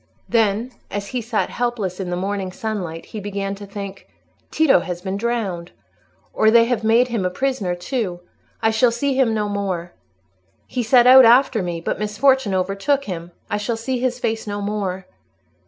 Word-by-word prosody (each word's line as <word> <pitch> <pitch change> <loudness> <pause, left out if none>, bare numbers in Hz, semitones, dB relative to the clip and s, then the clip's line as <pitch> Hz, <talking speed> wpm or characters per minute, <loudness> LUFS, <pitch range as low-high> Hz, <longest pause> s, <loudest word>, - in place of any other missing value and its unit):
Then, 225 +1 +1 0.2
as 200 0 -4
he 250 - -2
sat 225 -1 -1
helpless 230 -7 -2
in 185 -2 -3
the 175 - -1
morning 190 0 -3
sunlight, 180 -6 -5
he 215 - -7
began 200 -1 -3
to 200 0 -9
think, 200 -1 -8 0.4
"Tito 315 - +4
has 175 -1 -5
been 190 +1 -4
drowned, 200 -6 -3 0.6
or 220 - +4
they 230 +1 +6
have 240 -1 -1
made 230 +3 +4
him 230 -5 -1
a 180 - +1
prisoner 205 -4 -1
too. 180 -2 -3 0.4
I 225 - +4
shall 235 +3 +4
see 270 +4 -1
him 255 -4 +2
no 210 -1 0
more. 190 -4 -3 0.7
He 250 - -3
set 240 +1 +5
out 260 +1 +9
after 240 -1 +5
me, 175 -2 -4
but - - -3
misfortune 210 +1 +2
overtook 195 +10 0
him. 175 -6 -6 0.2
I 210 - -1
shall 225 +2 -2
see 250 +2 -2
his 250 0 -1
face 225 -3 -2
no 205 0 -3
more." 200 -2 -3
210 Hz, 180 wpm, -21 LUFS, 190-240 Hz, 0.7 s, out